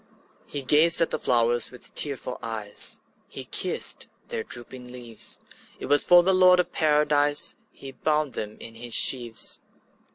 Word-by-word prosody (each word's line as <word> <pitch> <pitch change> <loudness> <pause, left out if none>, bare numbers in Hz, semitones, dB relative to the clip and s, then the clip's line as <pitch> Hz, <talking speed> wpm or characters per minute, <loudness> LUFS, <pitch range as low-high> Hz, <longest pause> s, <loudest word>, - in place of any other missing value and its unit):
'' - - -37
He 145 -2 -6
gazed 155 +5 +4
at 165 - 0
the - - -1
flowers 120 -1 0
with 125 - -10
tearful 135 -3 -1
eyes, 110 -3 -2 0.3
He - - -8
kissed - - +1 0.2
their - - -4
drooping 125 +2 -10
leaves; 120 -3 -5 0.4
It - - -8
was 145 +1 +4
for 175 0 +4
the 190 +2 +1
Lord 185 -1 +4
of 180 - -2
Paradise 150 -1 +1 0.2
He 135 - -11
bound 150 +1 -2
them 105 0 -6
in 115 - -11
his 120 +1 -3
sheaves. 120 -4 +3
130 Hz, 160 wpm, -23 LUFS, 120-150 Hz, 0.4 s, gazed